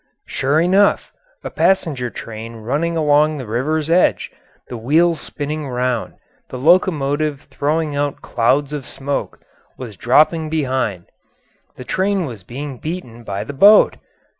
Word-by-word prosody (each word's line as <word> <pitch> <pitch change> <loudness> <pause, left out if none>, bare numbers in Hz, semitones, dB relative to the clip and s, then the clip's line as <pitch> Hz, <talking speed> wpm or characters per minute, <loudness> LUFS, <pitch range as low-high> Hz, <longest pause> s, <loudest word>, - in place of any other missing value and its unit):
] - - -56
Sure 140 +3 0
enough, 190 +4 +2 0.3
a - - -6
passenger 150 -10 +1
train 115 0 -8
running 145 +10 -2
along 150 0 +3
the 130 - -6
river's 145 +8 -1
edge, 170 +2 +2 0.4
the - - -7
wheels 160 +8 +2
spinning 150 -1 -5
round, 125 -1 -2 0.3
the 130 - -6
locomotive 150 -2 +2
throwing 150 +2 -1
out 145 -1 -2
clouds 135 +5 +1
of 140 -4 -5
smoke, 140 +1 -4 0.4
was 120 -5 -8
dropping 155 - +3
behind. 130 - -1 0.7
The - - -9
train 190 +5 0
was 115 -8 -8
being 130 +6 -7
beaten 140 -9 -6
by 100 -2 -4
the 125 - -7
boat. 205 +10 +6
145 Hz, 140 wpm, -19 LUFS, 125-160 Hz, 0.7 s, boat